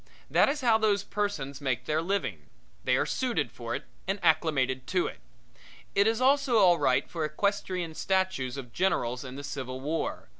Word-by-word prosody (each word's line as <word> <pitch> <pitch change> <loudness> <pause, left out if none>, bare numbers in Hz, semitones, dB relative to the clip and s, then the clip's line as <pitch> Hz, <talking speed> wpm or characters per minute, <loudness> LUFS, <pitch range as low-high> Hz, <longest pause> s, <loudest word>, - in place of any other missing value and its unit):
That - - +5
is 290 0 -2
how 230 -3 +4
those 205 -2 +2
persons 155 -11 -3
make 130 -5 -1
their 155 +1 +1
living. 130 - -2 0.4
They 125 - +3
are - - +1
suited 160 - -1
for 120 -1 -5
it - - -5 0.2
and 195 +1 0
acclimated 140 -6 +2
to 180 -1 +1
it. - - -6 0.7
It 200 +1 +4
is 225 +1 +1
also 270 -1 +3
all 180 -5 +6
right - - +2
for 165 -2 -4
equestrian 180 +1 -1
statues 185 -9 0
of 125 -4 -8
generals 125 -10 0
in 130 -1 -8
the 140 - -7
Civil 130 -2 -5
War. 150 - -3
160 Hz, 180 wpm, -29 LUFS, 130-200 Hz, 0.7 s, all